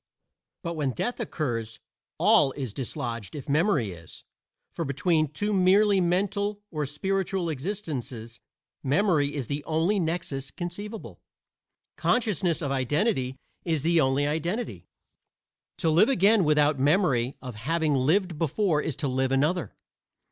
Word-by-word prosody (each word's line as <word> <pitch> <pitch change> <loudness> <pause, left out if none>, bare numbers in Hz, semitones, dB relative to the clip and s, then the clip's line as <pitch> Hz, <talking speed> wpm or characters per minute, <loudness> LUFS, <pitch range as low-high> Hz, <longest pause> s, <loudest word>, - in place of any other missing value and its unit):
But 170 -1 -3
when 145 -5 -1
death 245 - -3
occurs 120 - -3 0.4
all 135 - +4
is 130 -7 -5
dislodged 115 -2 -5
if 145 0 -7
memory 150 - +2
is; 85 -2 -11 0.5
for 170 - -3
between 155 +3 +1
two 205 +9 -2
merely 195 +1 +4
mental 200 +3 0
or 150 -3 -2
spiritual 190 +3 -1
existences 135 - -5 0.4
memory 145 -1 +2
is 140 -4 -2
the 145 +4 -4
only 165 +6 +1
nexus 160 -5 -2
conceivable; 205 +5 -7 0.8
consciousness 190 -8 +1
of 140 - -1
identity 135 - 0 0.3
is 160 -5 -1
the 165 0 +3
only 135 +1 +2
identity. 170 +10 -2 0.9
To 165 -3 +1
live 180 - +5
again 210 -5 +4
without 150 -1 +3
memory 140 -4 +2
of 125 -2 -7
having 155 +7 0
lived 160 +5 +1
before 165 0 +1
is 150 - -3
to 145 0 -2
live 130 0 0
another. 145 - 0
155 Hz, 130 wpm, -27 LUFS, 135-185 Hz, 0.9 s, live